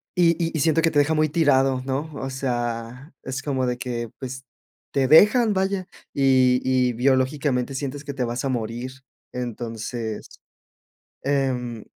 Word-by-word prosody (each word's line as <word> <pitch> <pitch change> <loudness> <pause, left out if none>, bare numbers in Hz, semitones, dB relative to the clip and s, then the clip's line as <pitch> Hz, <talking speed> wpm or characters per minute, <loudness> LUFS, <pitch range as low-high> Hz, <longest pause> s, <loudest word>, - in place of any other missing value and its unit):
y 175 -2 +5
y 165 - -2
y - - 0
siento 160 +2 +3
que 165 0 +2
te 145 - +3
deja 145 +2 +3
muy 155 0 +2
tirado, 135 -4 +3
¿no? 140 +4 -3
O 135 -1 -4
sea, 120 0 -4
es 130 0 -4
como 135 -3 -1
de 125 0 -1
que, 120 -2 -4
pues, 130 0 -6 0.5
te 135 -2 +1
dejan, 210 - +6
vaya, 190 -1 -1 0.3
y 130 -2 +4
y 130 -1 +2
biológicamente 130 +1 +1
sientes 140 +1 -4
que 145 -1 -6
te 135 -2 -2
vas 120 +1 -3
a - - 0
morir. 120 +1 -3 0.4
Entonces, 115 -2 -5 1.0
em, 125 -5 -1
130 Hz, 155 wpm, -23 LUFS, 125-145 Hz, 1.0 s, dejan